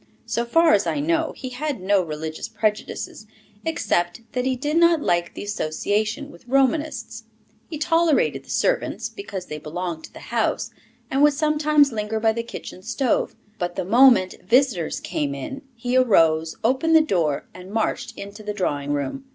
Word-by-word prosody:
So 235 - -1
far 330 +7 +4
as 205 -1 +3
I 295 - 0
know, 325 +2 +1
he 260 - -6
had 280 0 -3
no 195 +1 +2
religious 155 -1 -5
prejudices, 215 0 -3 0.4
except 205 - 0
that 250 0 -1
he 260 - +1
did 295 +5 -1
not 335 -1 +5
like 175 0 0
the - - -6
association 210 - -2
with 250 - -17
Romanists. 275 +4 0 0.4
He 315 - -5
tolerated 325 0 +2
the - - -21
servants, - - 0
because 200 - -7
they 150 -2 -6
belonged 165 +1 -5
to - - -15
the - - -11
house, - - 0 0.4
and 270 - +1
would 295 0 +6
sometimes 300 -1 +3
linger 215 0 -2
by 220 0 +3
the 230 +1 -2
kitchen 230 -5 -9
stove; 245 +4 0 0.2
but 175 -1 -2
the 190 - -2
moment 235 -2 +5
visitors 230 - +2
came 140 -2 -2
in 270 - -6
he 245 +2 -2
arose, 165 -10 +4
opened 270 +8 +3
the 320 - +8
door, 170 - 0
and 180 +1 -11
marched 225 +2 -2
into 200 +2 -8
the 210 0 -4
drawing 145 -7 -1
room. 145 - -3
225 Hz, 170 wpm, -23 LUFS, 180-285 Hz, 0.4 s, the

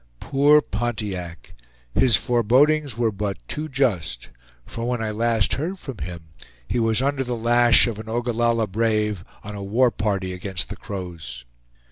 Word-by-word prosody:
Poor 145 +2 +4
Pontiac! 105 -7 -4 0.4
his 125 -5 +5
forebodings 130 +4 +2
were 115 -2 +1
but 100 -1 -3
too 155 +1 -4
just; 100 - -1 0.4
for 115 +1 -4
when 125 -1 -1
I 110 -1 -2
last 115 0 +1
heard 170 +7 -2
from 135 - -8
him, 85 +1 -6 0.5
he 120 - 0
was 115 +2 +2
under 140 -1 0
the 125 -1 -3
lash 120 +1 +5
of 115 -3 -4
an 110 0 -8
Ogallalla 120 -1 +1
brave, 105 -2 0 0.2
on 105 - -7
a 100 - -6
war 115 +6 +2
party 95 -4 -2
against 90 -3 -2
the - - -5
Crows. 85 -11 -7
115 Hz, 155 wpm, -23 LUFS, 100-125 Hz, 0.5 s, his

